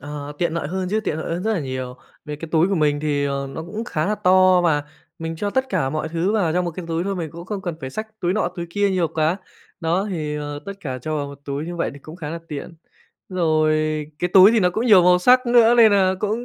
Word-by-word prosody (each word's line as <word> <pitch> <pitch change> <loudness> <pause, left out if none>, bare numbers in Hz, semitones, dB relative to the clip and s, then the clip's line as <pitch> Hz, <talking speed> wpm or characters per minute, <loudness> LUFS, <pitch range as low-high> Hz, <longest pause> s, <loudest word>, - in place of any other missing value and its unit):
Ờ, 145 0 -7
tiện 170 -2 0
lợi 160 -4 -3
hơn 185 +2 -3
chứ, 215 +2 +1
tiện 160 -8 -3
lợi 165 - -3
hơn 175 - -4
rất 220 +2 0
là 200 - -1
nhiều. 130 -2 -5 0.3
Về 150 -1 -6
cái 165 +2 -8
túi 165 +2 +4
của 200 - +1
mình 150 -3 +1
thì, 145 -2 0
ờ, 140 -1 -2
nó 160 - -6
cũng 215 +7 -6
khá 155 -8 -2
là 210 - +1
to, 185 -1 +4
và 160 -4 +2 0.4
mình 165 -1 -5
cho 205 +5 -2
tất 260 +4 +1
cả 135 - 0
mọi 155 +1 -3
thứ 170 +5 -1
vào 190 -7 +1
trong 180 +2 +1
một 175 - -2
cái 175 +2 -7
túi 165 +1 -1
thôi. 195 0 -2
Mình 165 -3 -4
cũng 170 +2 -9
không 200 -1 -4
cần 175 -3 -3
phải 130 -1 -6
xách 220 +7 -7
túi 175 0 +1
nọ 215 -1 0
túi 170 -1 -4
kia 200 +2 +1
nhiều 180 -3 +1
quá. 160 +2 0 0.4
Đó, 175 +4 0
thì, 155 -4 -3
ờ, 145 -1 -5
tất 200 - -4
cả 130 -6 -5
cho 155 +5 -3
vào 145 -1 -2
một 140 -1 -10
túi 140 +2 -4
như 175 0 -5
vậy 170 - -1
thì - - -11
cũng 155 +4 -11
khá 150 -4 -6
là 165 - -4
tiện. 150 +2 -7 0.5
Rồi 155 -4 +2 0.4
cái 175 +1 -1
túi 190 +1 +9
thì 230 - +3
nó 180 -2 +3
cũng 220 +7 -2
nhiều 205 -6 +7
màu 180 0 +5
sắc 250 +7 +4
nữa, 240 -1 +5
nên 225 -3 +7
nà 190 -2 +3
cũng 220 +3 -1
170 Hz, 280 wpm, -21 LUFS, 155-195 Hz, 0.5 s, túi